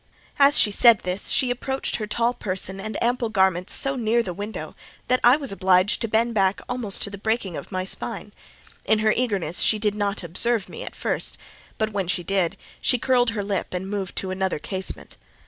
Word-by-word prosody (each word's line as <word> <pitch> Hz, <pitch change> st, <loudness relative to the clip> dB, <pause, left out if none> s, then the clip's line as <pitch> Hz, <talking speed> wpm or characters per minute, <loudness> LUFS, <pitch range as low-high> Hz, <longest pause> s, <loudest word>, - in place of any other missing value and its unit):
As 280 Hz, +1 st, +6 dB
she 210 Hz, -, +5 dB
said 230 Hz, +1 st, +6 dB
this, 185 Hz, +2 st, -1 dB
she 255 Hz, -3 st, +2 dB
approached 265 Hz, +2 st, -2 dB
her 215 Hz, -, -4 dB
tall 235 Hz, +3 st, 0 dB
person 190 Hz, -2 st, -3 dB
and 215 Hz, +2 st, -5 dB
ample 240 Hz, -1 st, 0 dB
garments 190 Hz, -3 st, +1 dB
so 275 Hz, 0 st, +1 dB
near 235 Hz, -1 st, +1 dB
the 180 Hz, -, -5 dB
window, 205 Hz, +4 st, -6 dB, 0.3 s
that 255 Hz, 0 st, +3 dB
I 245 Hz, +4 st, +7 dB
was 275 Hz, -6 st, -5 dB
obliged 190 Hz, +1 st, +2 dB
to 230 Hz, -, -1 dB
bend 230 Hz, +2 st, +1 dB
back 195 Hz, -2 st, +2 dB
almost 245 Hz, -5 st, -2 dB
to 200 Hz, -, -2 dB
the 200 Hz, -, -8 dB
breaking 220 Hz, -4 st, -1 dB
of -, -, -8 dB
my 185 Hz, -1 st, -2 dB
spine: 190 Hz, -, -3 dB, 0.5 s
in 220 Hz, -, +3 dB
her 215 Hz, -, +5 dB
eagerness 200 Hz, -9 st, 0 dB
she 215 Hz, -, +3 dB
did 210 Hz, -1 st, 0 dB
not 205 Hz, -1 st, -2 dB
observe 200 Hz, +5 st, +1 dB
me -, -, -9 dB
at -, -, -8 dB
first, -, -, -2 dB, 0.4 s
but 220 Hz, -1 st, -1 dB
when 195 Hz, -3 st, -2 dB
she 180 Hz, 0 st, -1 dB
did, 185 Hz, -1 st, 0 dB, 0.2 s
she 250 Hz, -, +3 dB
curled 245 Hz, 0 st, +2 dB
her 205 Hz, -, -1 dB
lip 195 Hz, -2 st, -3 dB
and 185 Hz, +1 st, -4 dB
moved 195 Hz, -3 st, -4 dB
to 190 Hz, -, +1 dB
another 190 Hz, -2 st, -1 dB
casement. 190 Hz, +5 st, -5 dB
205 Hz, 205 wpm, -23 LUFS, 190-235 Hz, 0.5 s, I